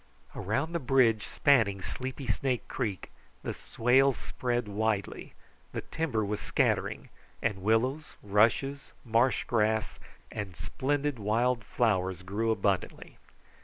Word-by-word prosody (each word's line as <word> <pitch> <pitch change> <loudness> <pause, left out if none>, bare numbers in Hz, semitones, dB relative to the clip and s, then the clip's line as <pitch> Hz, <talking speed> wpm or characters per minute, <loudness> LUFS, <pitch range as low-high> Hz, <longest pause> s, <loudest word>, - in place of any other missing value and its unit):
Around 135 - -1
the 170 - 0
bridge 125 -5 +3
spanning 115 -9 +3
Sleepy 130 +7 -5
Snake 130 -1 -1
Creek 105 -8 -3 0.3
the - - -3
swale 130 +4 +3
spread 120 -2 -2
widely, 105 -1 -2 0.4
the - - -2
timber 130 -10 -1
was 105 +1 -2
scattering, - - 0 0.3
and 95 -2 -1
willows, 125 +9 +1
rushes, 115 +7 +2
marsh 115 +3 +2
grass, 110 -2 0 0.3
and 100 -4 -5
splendid 145 +3 -1
wild 115 +3 +1
flowers 95 -6 0
grew 105 +4 -1
abundantly. 100 -4 -1
115 Hz, 115 wpm, -30 LUFS, 105-130 Hz, 0.4 s, bridge